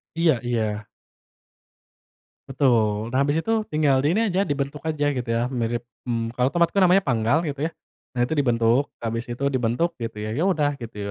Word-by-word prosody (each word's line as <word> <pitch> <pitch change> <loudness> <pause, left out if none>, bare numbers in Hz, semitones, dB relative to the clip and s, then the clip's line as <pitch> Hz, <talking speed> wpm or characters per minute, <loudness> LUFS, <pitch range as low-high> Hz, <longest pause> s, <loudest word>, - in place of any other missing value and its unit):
Iya 160 -8 +3
iya. 110 -3 -1 1.6
Betul. 115 -5 +1
Nah 130 - +2
habis 145 +2 +2
itu 225 - 0 0.2
tinggal 145 -4 +2
di 155 +8 +1
ini 225 - +3
aja, 190 - +1
dibentuk 145 -4 -2
aja 145 -2 0
gitu 125 -3 -4
ya 120 +3 0
mirip 120 -1 -2 0.2
mmm, 115 -1 -1
kalau 125 +1 +1
tomat 170 +2 +1
itu 200 - +2
namanya 185 +1 +5
panggal 125 +6 +1
gitu 145 -2 -4
ya. - - -13 0.5
Nah 120 - +3
itu 140 - -4
dibentuk, 120 -2 +2 0.2
habis 115 +1 -3
itu 120 +3 -4
dibentuk 125 +7 0
gitu 115 -2 -5
ya. 105 +1 -4
Ya 165 +10 +1
udah 150 -5 +2
gitu 115 -2 -8
130 Hz, 185 wpm, -24 LUFS, 115-150 Hz, 1.6 s, namanya